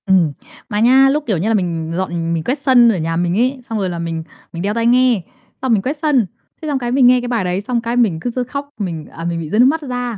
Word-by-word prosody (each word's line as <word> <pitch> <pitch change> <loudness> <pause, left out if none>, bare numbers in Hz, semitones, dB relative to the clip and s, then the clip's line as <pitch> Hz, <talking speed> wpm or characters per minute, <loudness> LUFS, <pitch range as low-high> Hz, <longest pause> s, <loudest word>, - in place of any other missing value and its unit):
Ừm. 180 -7 +3 0.4
Mà 210 -2 -1
nha, 260 +4 +5
lúc, 295 +2 0
kiểu 205 -6 +1
như 180 +6 -1
là, 225 - +2
mình 170 -5 -1
dọn 170 -2 -2
mình 165 -1 -2
quét 260 - -1
sân 255 -4 +5
ở 215 - +1
nhà 165 0 -2
mình 175 +2 0
ấy, 255 +3 0
xong 225 - -2
rồi 190 -2 -1
là 170 -1 -4
mình 165 -1 -3 0.3
mình 170 - -5
đeo 200 +3 -1
tai 230 +1 -1
nghe, 245 -3 +4 0.4
xong 260 -2 +1
mình 210 - +2
quét 280 +8 -3
sân. 290 -8 +2 0.4
Thế 315 - -5
xong 285 -3 0
cái 240 -1 -3
mình 255 -1 +5
nghe 250 0 +5
cái 245 - -5
bài 235 -4 0
đấy, 180 +1 -1
xong 240 +2 -2
cái 235 +1 -3
mình 215 -10 +2
cứ 245 - -3
rứa 250 +1 -2
khóc, 280 +3 -6
mình, 170 -6 -4
à, 165 - -9
mình 170 -1 -2
bị 160 -2 -6
rơi 210 - 0
nước 245 - +7
mắt 315 +5 +2
ra, 245 -4 -4
230 Hz, 295 wpm, -18 LUFS, 175-255 Hz, 0.4 s, nước